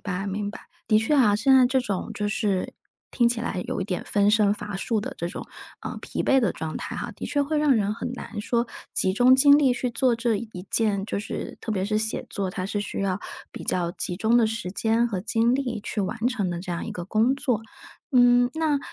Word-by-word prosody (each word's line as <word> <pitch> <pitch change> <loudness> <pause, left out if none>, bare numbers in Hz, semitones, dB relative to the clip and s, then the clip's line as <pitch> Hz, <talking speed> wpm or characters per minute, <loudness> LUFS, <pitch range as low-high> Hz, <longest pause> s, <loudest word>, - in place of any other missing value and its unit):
白 195 -1 -3
明 200 +1 -3
白。 - - -10 0.3
的 215 - +4
确 225 +7 +1
啊， 225 -7 +5
现 265 +5 +4
在 255 - +6
这 260 +1 +2
种 200 -6 -3
就 210 0 -2
是， 205 -3 -1 0.4
听 240 - +2
起 235 -1 -2
来 185 -5 -3
有 - - -3
一 - - -1
点 185 -3 -3
分 205 0 +2
身 210 -2 +4
乏 210 -1 -5
术 220 +3 -1
的 - - -6
这 170 - -3
种， - - -7 0.3
呃， - - -6
疲 - - -3
惫 270 - +4
的 230 -7 +1
状 160 -1 -5
态 - - -6
哈， - - -4
的 - - -8
确 285 - 0
会 300 +2 -1
让 300 -2 +4
人 210 -1 +1
很 240 +2 -5
难 225 -3 -7
说 235 +2 0 0.3
集 190 0 +1
中 250 +3 +6
精 285 +2 +7
力 275 -4 +4
去 250 0 -2
做 250 0 +2
这 230 -2 0
一 200 -4 -8
件 205 -3 +1
就 - - -2
是 210 - -5
特 220 - -2
别 190 -3 -1
是 215 0 0
写 220 +1 -1
作， 195 -2 -2
它 185 0 -4
是 205 +1 -2
需 205 - -5
要 195 -1 0 0.3
比 - - -8
较 175 -2 0
集 175 - -3
中 225 +5 +2
的 230 -2 +5
时 220 -4 -4
间 225 +4 +1
和 195 -5 -3
精 230 +3 +2
力 245 -5 -2
去 210 -1 -2
完 235 +5 -1
成 210 -8 -1
的 170 -1 -4
这 185 0 -7
样 170 - -3
一 - - -5
个 175 - -6
工 225 +6 +2
作。 250 -6 -1 0.5
嗯， 245 0 +5
那， 315 -3 +1
220 Hz, 260 characters per minute, -25 LUFS, 200-245 Hz, 0.5 s, 精